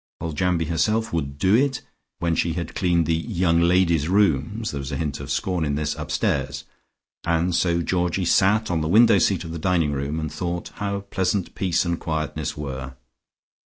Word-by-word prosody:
Foljambe 85 +1 0
herself 110 +8 0
would 70 -4 -2
"do" 95 +6 +2
it, 135 +3 +2 0.4
when 85 -1 0
she 85 0 0
had 85 -2 -4
cleaned 85 -3 +1
the 80 - +1
"young 85 -1 +1
ladies'" 85 -3 +3
rooms 100 +2 +1
(there 70 - -4
was 70 -1 -5
a - - -2
hint 75 -4 -3
of 70 0 -7
scorn 90 +5 -1
in 70 -2 0
this) 75 0 -1
upstairs, 70 -1 -2 0.6
and 85 +1 +1
so 85 0 +1
Georgie 90 +1 0
sat 105 +4 +3
on 85 -2 0
the 80 - -1
window 110 +3 +6
seat 90 -1 +1
of 80 - -7
the 85 - -5
dining 85 -3 +1
room, 70 +3 -2
and 80 -1 -4
thought 85 -1 -3
how 100 -1 -2
pleasant 95 -1 -1
peace 95 -2 0
and 85 -1 -1
quietness 80 -3 -3
were. 65 -2 -6
85 Hz, 185 wpm, -23 LUFS, 80-95 Hz, 0.6 s, window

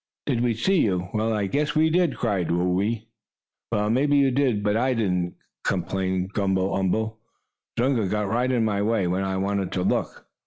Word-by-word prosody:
"Did 125 -5 0
we 120 -2 +1
see 185 - +2
you? 90 -3 0
Well, 110 +1 0
I 105 -2 0
guess 150 +8 -1
we 160 +1 +3
did!" 175 -4 +2
cried 100 -7 -1
Whoo 90 +2 +1
ee. 110 +2 -2 0.6
"Well, 105 -1 +1
maybe 145 +4 +3
you 135 -1 +4
did, 125 -6 +1
but 105 0 +1
I 125 +3 +1
didn't," 90 -6 -1 0.3
complained 95 0 -1
Gumble 95 -1 0
umble. 110 +4 -1 0.6
"Zunga 120 -4 +1
got 105 +1 -1
right 120 +5 +1
in 120 -3 +2
my 100 -2 0
way, 105 -2 +1
when 90 +2 0
I 95 0 -1
wanted 100 0 -1
to 90 - -1
look." - - -1
105 Hz, 190 wpm, -24 LUFS, 95-125 Hz, 0.6 s, you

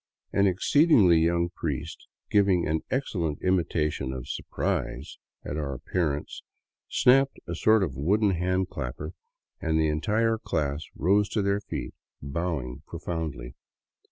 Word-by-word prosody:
An 100 0 +4
exceedingly 100 - +5
young 85 +1 +2
priest, 75 -6 -5 0.2
giving 100 -4 +4
an 80 0 0
excellent 85 - -1
imitation 80 -7 0
of 65 -2 -6
surprise - - -3 0.3
at 75 - -4
our 70 -3 -3
appearance, 75 +1 -2 0.5
snapped 135 +2 +4
a 85 - -4
sort 110 +4 +4
of 80 -8 -3
wooden 100 +8 +2
hand 90 +1 0
clapper, - - -5 0.5
and 80 -1 +1
the 80 -1 +2
entire 110 +8 +1
class 75 -5 -2
rose 100 +6 +2
to 105 - 0
their 100 +1 +1
feet 100 - -5 0.3
bowing 70 -3 -3
profoundly. 80 -7 -5
85 Hz, 125 wpm, -27 LUFS, 75-100 Hz, 0.5 s, exceedingly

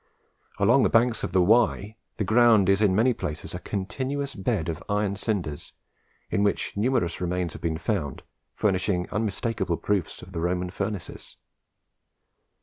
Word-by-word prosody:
Along - - +4
the - - +3
banks 115 0 +2
of - - -2
the 95 -1 +4
Wye, 110 0 +2 0.2
the - - 0
ground 110 -2 +5
is 100 +1 +3
in 100 -3 +3
many 120 +5 +4
places 75 -8 -5
a 90 - -4
continuous 130 +9 -3
bed 95 -4 -1
of 80 -2 -4
iron 100 -1 0
cinders, 95 -8 -3 0.6
in - - +1
which 100 0 0
numerous 105 -6 0
remains 90 -2 -1
have - - -10
been 80 -2 -1
found, 80 - -3 0.3
furnishing 95 -3 0
unmistakeable 105 -3 -1
proofs 100 -5 -2
of 90 - -12
the 85 -3 -4
Roman 90 +1 -1
furnaces. 100 -1 -5
100 Hz, 150 wpm, -26 LUFS, 90-110 Hz, 0.6 s, ground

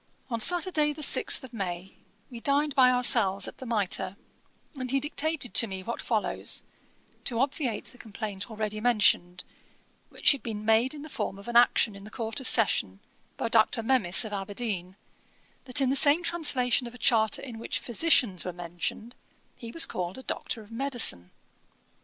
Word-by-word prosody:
On 230 - -2
Saturday, 325 - +1
the 305 +1 -4
sixth - - +5
of 255 - -12
May, 190 -3 -6 0.4
we 240 - -8
dined 285 +3 +1
by 260 -2 +5
ourselves 230 -6 +3
at - - -11
the 260 - -8
Mitre, 195 -3 -1 0.6
and 255 -3 -6
he 275 +2 +2
dictated 295 -2 -2
to 230 - +6
me 190 -2 -7
what 235 +4 -5
follows, 220 -3 -1 0.6
to 240 - -1
obviate 265 -4 -2
the 245 - -14
complaint 205 -2 -6
already 215 -1 -4
mentioned, 190 -6 +2 0.7
which - - +3
had 280 - -2
been 215 -2 -6
made 225 +6 +2
in 290 - -9
the - - -9
form 195 - -4
of 200 - -13
an 240 - -5
action 235 -3 +4
in 200 - -12
the 210 - -11
Court 225 +3 -4
of 265 - -4
Session, 100 - +1 0.4
by - - -2
Dr. 225 0 +2
Memis, 225 -5 +2
of 210 - -7
Aberdeen, 195 -2 -4 0.7
that 255 +1 +2
in 265 -1 +2
the - - +1
same 295 +4 +5
translation 270 -8 +1
of 235 - -11
a - - -11
charter 220 -3 +1
in 240 -5 -8
which - - -3
physicians 240 - +1
were 180 - -4
mentioned, 175 +7 -6 0.4
he 230 -2 -9
was 330 - +3
called 185 +8 -6
Doctor 225 - -4
of 210 - -19
Medicine. 230 - 0
230 Hz, 175 wpm, -27 LUFS, 200-265 Hz, 0.7 s, to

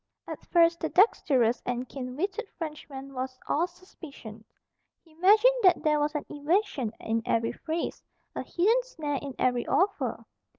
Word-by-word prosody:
At - - -7
first 335 -1 +4
the 320 - -2
dexterous 265 - +3
and 250 +1 -3
keen 255 -1 -7
witted 400 +7 -3
Frenchman 285 -4 -7
was 255 0 -4
all 335 +4 +1
suspicion. 300 - -12 0.6
He 330 - -23
imagined 415 +9 +5
that 365 -4 +4
there 300 -1 +3
was 295 +1 0
an 300 - -2
evasion 295 - 0
in 225 +1 -1
every 230 0 0
phrase, 325 +1 -4 0.3
a - - -2
hidden 440 +8 +2
snare 305 - -4
in 275 -2 -7
every 245 -1 +1
offer. 395 +3 0
300 Hz, 155 wpm, -28 LUFS, 255-360 Hz, 0.6 s, imagined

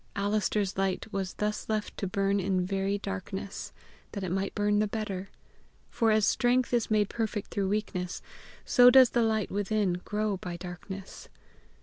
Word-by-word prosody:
Alister's 205 -1 0
light 195 -1 0
was 190 -2 -3
thus 210 +1 -2
left 215 -1 -2
to 195 - -2
burn 195 +1 +1
in 185 -1 0
very 195 +1 0
darkness, 195 0 -5 0.4
that 200 - -4
it 180 - -3
might 195 +1 -2
burn 205 0 +2
the 215 - +2
better; 200 -3 -4 0.6
for 230 - +2
as 215 -1 +4
strength 245 +1 +2
is 235 -2 +1
made 210 -2 +3
perfect 220 -2 -3
through 195 -2 -1
weakness, 195 -4 -2 0.4
so 245 -1 +7
does 255 -1 +7
the 240 - +2
light, 220 -3 +1
within 200 -3 0
grow 210 -1 -1
by 180 -1 -6
darkness. 180 +2 -8
200 Hz, 160 wpm, -29 LUFS, 190-215 Hz, 0.6 s, so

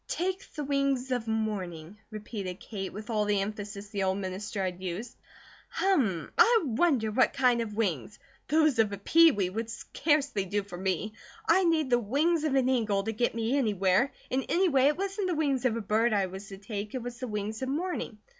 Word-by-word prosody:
"Take 375 +2 -3
the 300 - -3
wings 275 -2 0
of 245 -3 -1
morning," 205 -5 -3
repeated 205 -4 -6
Kate, 195 -4 -6
with 215 +4 -7
all 210 -1 +1
the 205 -1 +1
emphasis 205 0 -5
the 200 -1 -3
old 190 0 +1
minister 195 +1 -4
had 180 0 -4
used. 190 +6 -5 0.5
"Hummm! 235 - +1
I 465 -1 +6
wonder 245 -3 +1
what 255 +4 +3
kind 250 -3 +3
of 215 -2 -5
wings. 205 - -2 0.3
Those 310 -4 +3
of 215 -2 +3
a 200 - -4
peewee 210 - +4
would 225 +4 -4
scarcely 280 -2 0
do 205 +2 -1
for 185 -3 -9
me; 190 +3 -1 0.3
I'd 375 -1 +4
need 315 -5 +1
the 240 - +5
wings 295 +9 +1
of 285 -3 +1
an 260 -2 +3
eagle 220 -6 +1
to 225 - -2
get 230 +1 0
me 230 +3 0
anywhere, 210 -1 +2 0.2
and 265 +1 +1
anyway 335 -8 +3
it 295 +2 +3
wasn't 395 +1 -2
the 355 - 0
wings 280 -5 0
of 230 -3 +2
a - - -3
bird 220 +3 +2
I 200 -2 +2
was 190 +2 -8
to 195 - -9
take, 205 +2 -6
it 255 - -3
was 245 -1 -7
the 255 - -4
wings 210 +1 -4
of 260 - -2
morning. 315 -6 -3
225 Hz, 200 wpm, -29 LUFS, 200-275 Hz, 0.5 s, I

